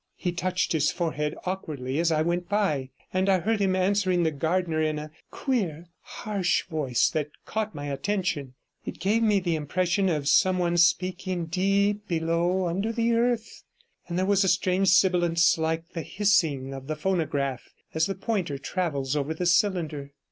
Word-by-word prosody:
He 180 - -2
touched 180 +1 -1
his 155 -2 +2
forehead 150 -3 -2
awkwardly 150 -7 -3
as 165 0 +2
I 155 -1 +2
went 175 +1 -2
by, 155 -11 0 0.2
and 185 +1 +1
I 190 - +5
heard 220 +5 0
him 190 -2 +2
answering 185 -1 +2
the 160 - +1
gardener 160 +2 0
in 155 -1 0
a 150 0 -7 0.2
queer, 175 - -2
harsh 200 -4 -1
voice 150 -8 +1
that 150 -2 -1 0.2
caught 215 -1 -3
my 145 -1 -5
attention; 145 -3 -2 0.3
it - - -6
gave 215 +4 +1
me 210 -3 +3
the 175 -2 -1
impression 180 +5 0
of 150 -4 -1
some 185 +5 +4
one 175 -1 0
speaking 180 +1 +1
deep 200 +4 +1
below 170 +2 0
under 195 +6 -1
the 230 0 +1
earth, 235 -1 0 0.5
and 170 - -3
there 185 - +1
was 200 0 +3
a - - +1
strange 185 +1 +2
sibilance, 175 -3 +4
like 160 +1 -2
the 170 - -5
hissing 160 -10 +1
of 135 0 -8
the 155 - -2
phonograph 150 -7 -1 0.2
as 160 0 +1
the 195 - -3
pointer 190 -8 -2
travels 140 -3 -2
over 150 +2 -1
the 180 - -3
cylinder. 165 -6 +1
175 Hz, 170 wpm, -26 LUFS, 155-190 Hz, 0.5 s, I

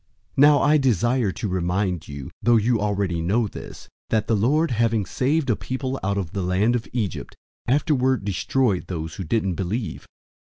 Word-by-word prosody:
001:005 - - -35
Now 145 +1 +7
I 150 +1 +5
desire 120 -3 +2
to 110 - -4
remind 90 -1 -1
you, 70 -2 -8
though 120 0 +4
you 115 +1 +2
already 100 -5 -1
know 105 +8 +1
this, - - -10 0.2
that 110 -1 +1
the 115 - +1
Lord, 145 +10 +2
having 115 -2 +1
saved 140 +7 0
a - - +2
people 130 +3 -4
out 100 +1 0
of 90 -5 -3
the 100 - -3
land 95 +6 +2
of 115 - -3
Egypt, 110 -6 -3 0.3
afterward 130 - +1
destroyed 105 +1 0
those 80 -3 -5
who 95 - -4
didn't 95 +1 0
believe. 100 +6 -4
110 Hz, 175 wpm, -23 LUFS, 95-130 Hz, 0.3 s, Now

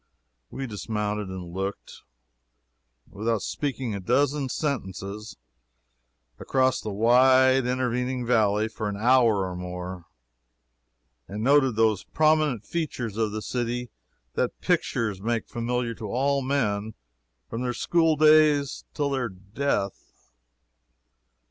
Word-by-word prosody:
We 135 - -5
dismounted 105 -2 -3
and 90 -2 -7
looked, 95 +2 -5 1.1
without 110 0 -2
speaking 130 -4 -3
a 100 - -3
dozen 140 +6 +1
sentences, 105 - -4 1.0
across 130 -1 +1
the 110 - -5
wide 130 +4 +4
intervening 125 0 -1
valley 110 -3 +2
for 110 -1 -4
an 100 - -4
hour 115 -3 +4
or 90 - -6
more; 90 0 -6 1.2
and 105 +2 -5
noted 135 -2 +4
those 110 -3 +2
prominent 155 -7 +2
features 130 -10 -3
of 110 -1 0
the 110 0 -4
city 120 -1 -3 0.4
that - - -1
pictures 105 -5 0
make 115 +1 -1
familiar 120 0 -2
to 110 -1 -7
all 140 +6 +1
men 110 -6 -1 0.5
from 115 - -5
their 125 -1 -1
school 165 -2 +2
days 150 -2 +4
till 145 -2 0
their 130 -3 -1
death. 100 - -4
115 Hz, 115 wpm, -26 LUFS, 105-130 Hz, 1.2 s, wide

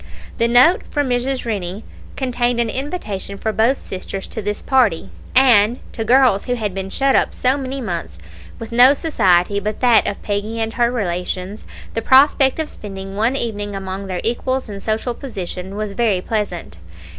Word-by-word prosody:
The 230 - +3
note 250 +10 +5
from 290 -3 -1
Mrs. 250 +1 -1
Rennie 200 -2 -4 0.3
contained 245 -2 0
an 230 -2 0
invitation 235 - -4
for 220 +2 -2
both 235 +6 +2
sisters 190 +1 -6
to 220 - -4
this 210 0 -4
party; 240 -11 +2 0.2
and 245 -3 +5
to 225 - -3
girls 245 -3 +4
who 245 - -1
had 210 -5 -3
been 195 0 -5
shut 270 +6 +1
up - - +1
so 255 +1 +2
many 270 -1 -4
months 170 - -5 0.4
with 230 0 -8
no 250 +4 +7
society 200 - +2
but 210 +1 -4
that 245 -3 +4
of 200 - -3
Peggy 210 +2 -3
and 225 0 -2
her 235 -1 +2
relations, 185 -2 -3 0.3
the 225 - -2
prospect 265 +1 +5
of 315 -1 -2
spending 195 -4 -8
one 225 +6 +1
evening 205 -5 -2
among 195 0 -5
their 185 -1 -3
equals 255 +3 -1
in 200 -2 -7
social 220 +4 -2
position 190 -7 -6
was 210 -1 -4
very 210 -3 +1
pleasant. 185 - -4
220 Hz, 175 wpm, -19 LUFS, 195-255 Hz, 0.4 s, no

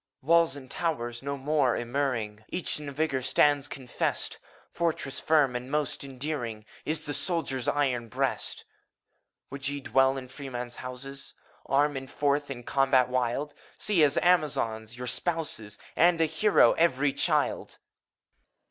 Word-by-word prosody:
EUPHORION. - - -21
Walls 170 -4 +5
and 130 -2 -11
towers 120 -8 -2
no 140 +1 -3
more 140 -2 +1
immuring. 120 -4 -2
Each 180 -3 -2
in 145 -1 -6
vigor 140 -2 -1
stands 145 +2 +3
confessed! 130 -4 -2 0.3
Fortress 160 -5 -1
firm 150 -5 +3
and 125 +1 -4
most 150 -1 -1
enduring 130 -5 -4 0.2
Is 155 +1 -1
the 145 - -3
soldier's 140 -8 0
iron 130 -5 +1
breast. - - -1 0.9
Would 140 0 -4
ye 145 0 -2
dwell 135 0 +2
in 130 -1 -6
freemen's 125 -2 -6
houses 135 +2 -6
t - - -36 0.3
Arm, 145 +2 +2
and 135 0 -6
forth 145 0 0
to 125 -3 -7
combat 135 -1 +3
wild! 130 +4 -1 0.2
See, 205 -6 +1
as 145 -1 +3
Amazons, 120 -10 +1
your 125 - -5
spouses, 125 - -2 0.2
And 170 0 +4
a 165 - +4
hero 160 - +4
every 145 -4 +2
child! - - 0
135 Hz, 145 wpm, -28 LUFS, 125-150 Hz, 0.9 s, Walls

